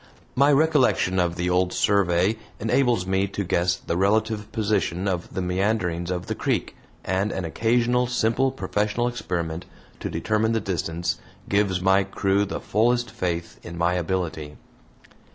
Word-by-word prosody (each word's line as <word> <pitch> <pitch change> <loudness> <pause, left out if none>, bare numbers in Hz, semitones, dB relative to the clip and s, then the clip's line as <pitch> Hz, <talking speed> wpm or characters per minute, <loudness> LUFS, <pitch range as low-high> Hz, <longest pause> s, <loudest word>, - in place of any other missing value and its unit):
My 140 +3 +4
recollection 140 - +3
of 85 -1 +1
the 90 +1 -2
old 90 0 +2
survey 100 +1 +2 0.2
enables 115 -3 +2
me 95 +1 +1
to 100 +1 -3
guess 90 0 +1
the 85 - -4
relative 105 +3 +1
position 100 -4 0
of 90 -2 -2
the 95 - -1
meanderings 90 -2 0
of 90 0 -2
the - - -2
creek, - - -2 0.3
and 95 +3 0
an 95 - -3
occasional 120 +7 +1
simple 120 +2 +1
professional 115 -2 -1
experiment 85 -8 -3 0.3
to - - -4
determine 110 +1 0
the 115 - +2
distance 85 -3 -2 0.3
gives 100 -2 +1
my 95 +1 +4
crew 100 +1 +1
the 100 - -4
fullest 120 +1 +1
faith 85 -6 -3
in 85 0 -8
my 85 +1 +2
ability. 85 -4 -3
95 Hz, 150 wpm, -24 LUFS, 90-110 Hz, 0.3 s, My